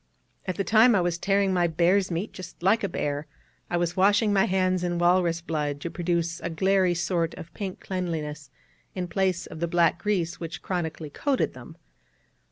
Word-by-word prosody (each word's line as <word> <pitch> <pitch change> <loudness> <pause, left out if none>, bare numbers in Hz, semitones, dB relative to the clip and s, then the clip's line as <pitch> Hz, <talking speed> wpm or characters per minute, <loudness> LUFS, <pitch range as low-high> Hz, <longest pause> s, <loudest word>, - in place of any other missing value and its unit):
At 185 - -1
this 195 - -2
time 225 +1 +6
I 190 - +3
was 175 -1 -1
tearing 195 0 +2
my 175 -1 +3
bear's 175 +4 +2
meat 180 +5 -3
just 180 -2 -10
like 210 +4 +3
a 200 - 0
bear; 145 -2 -3 0.4
I 175 - 0
was 175 0 -1
washing 205 +2 +3
my 195 -1 +4
hands 185 -1 +1
in 175 -1 -1
walrus 175 -1 +2
blood 150 -4 -2
to 170 - -4
produce 170 -1 -1
a 170 - -4
glairy 190 +1 +2
sort 170 -1 -1
of 165 +1 -10
pink 190 -1 -5
cleanliness, 155 -6 -4 0.5
in 180 -1 -3
place 185 -1 0
of - - -9
the 170 - 0
black 170 0 +2
grease 180 -5 -1
which 165 -1 -6
chronically 160 -4 -3
coated 275 - 0
them. - - -12
175 Hz, 185 wpm, -26 LUFS, 165-190 Hz, 0.5 s, time